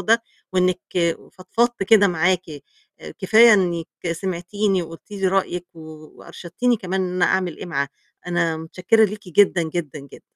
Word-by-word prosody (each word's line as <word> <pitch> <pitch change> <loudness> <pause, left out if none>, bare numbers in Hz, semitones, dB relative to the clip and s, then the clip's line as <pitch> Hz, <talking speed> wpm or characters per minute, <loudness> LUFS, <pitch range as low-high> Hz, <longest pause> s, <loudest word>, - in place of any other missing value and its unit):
ده، 230 +1 +2 0.3
وإنِك 185 -1 +1 0.5
فضفضت 230 +5 -1
كده 205 0 +5
معاكِ، 180 +1 +1 0.6
آآ - - -9
كفاية 220 +3 +6
إنِك 175 -4 0 0.3
سمعتيني 185 +2 -2
وقُلتِ 165 +4 -12
لي 195 -2 -2
رأيِك 180 -2 -1
و 165 - -13 0.4
وأرشدتيني 240 +8 -2
كمان 190 -2 -3
إن 185 -1 -2
أنا 180 - +3
أعمل 185 -3 0
إيه - - -8
معاها. 140 -5 -2 0.4
أنا 170 -2 0
متشكرة 185 +7 +1
ليكِ 210 -2 -5
جدًا 185 -1 +3
جدًا 160 -2 -4
جدًا. 140 -1 -14
185 Hz, 150 wpm, -21 LUFS, 170-205 Hz, 0.6 s, كفاية